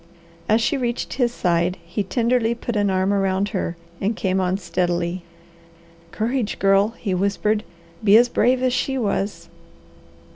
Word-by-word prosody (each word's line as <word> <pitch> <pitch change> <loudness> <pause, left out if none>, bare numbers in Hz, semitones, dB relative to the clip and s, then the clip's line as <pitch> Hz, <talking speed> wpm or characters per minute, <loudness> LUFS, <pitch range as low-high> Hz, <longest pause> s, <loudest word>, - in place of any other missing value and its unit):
As 220 +2 +4
she 280 +5 +1
reached 240 -1 -2
his 245 -3 +1
side, 175 -4 0
he 175 +5 -3
tenderly 235 +3 +1
put 235 0 -5
an 205 -1 +2
arm 190 +1 +1
around 195 0 +1
her, 175 -3 -3 0.2
and 210 +4 0
came 190 -1 0
on 185 +1 0
steadily. 175 -1 -1 0.9
"Courage 230 +3 -2
Girl!" 195 +3 +3
he 200 -4 -2
whispered. 200 +3 0 0.4
"Be 210 0 +7
as 240 +1 +5
brave 250 +2 +2
as 255 -1 +2
she 270 +1 0
was!" 200 -6 -2
205 Hz, 150 wpm, -22 LUFS, 185-235 Hz, 0.9 s, Be